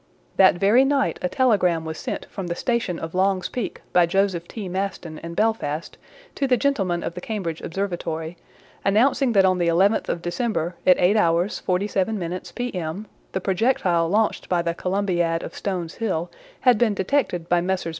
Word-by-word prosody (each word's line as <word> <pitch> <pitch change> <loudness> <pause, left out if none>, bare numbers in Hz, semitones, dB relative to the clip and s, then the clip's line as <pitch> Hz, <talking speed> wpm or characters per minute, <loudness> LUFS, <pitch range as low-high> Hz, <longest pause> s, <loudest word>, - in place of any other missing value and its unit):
That 190 -2 +6
very 205 +8 +4
night 275 0 +1
a 180 - 0
telegram 185 -7 +2
was 160 0 -4
sent - - -4
from 190 -3 -6
the 170 - -2
station 235 -6 -1
of 165 0 -6
Long's 190 0 +1
Peak 245 -5 -5
by 175 -1 +5
Joseph 185 -2 0
T. 210 -4 -6
Maston 180 -4 -4
and 170 0 -8
Belfast 190 -8 -1 0.4
to 275 - -1
the 250 -1 +3
gentlemen 195 -11 0
of - - -3
the 180 - -7
Cambridge 180 -8 -4
Observatory, 170 -3 -3 0.5
announcing 245 +5 +3
that 195 -2 +5
on 185 -1 +2
the 170 - +1
11th 190 +6 +2
of 170 - -2
December 175 -2 -1
at 180 - +7
8h. 180 -1 +2
47m. 185 -1 -2
P.M., 195 -6 -4 0.3
the 190 - -1
projectile 185 -4 +1
launched 215 +3 0
by 175 -2 +1
the 170 0 -1
Columbiad 175 -3 0
of - - -7
Stones 180 -5 -3
Hill 175 -6 -2 0.3
had 250 -5 +4
been 220 -4 +2
detected 190 -5 0
by 175 0 +2
Messrs. 185 -1 -1
185 Hz, 170 wpm, -23 LUFS, 170-215 Hz, 0.5 s, at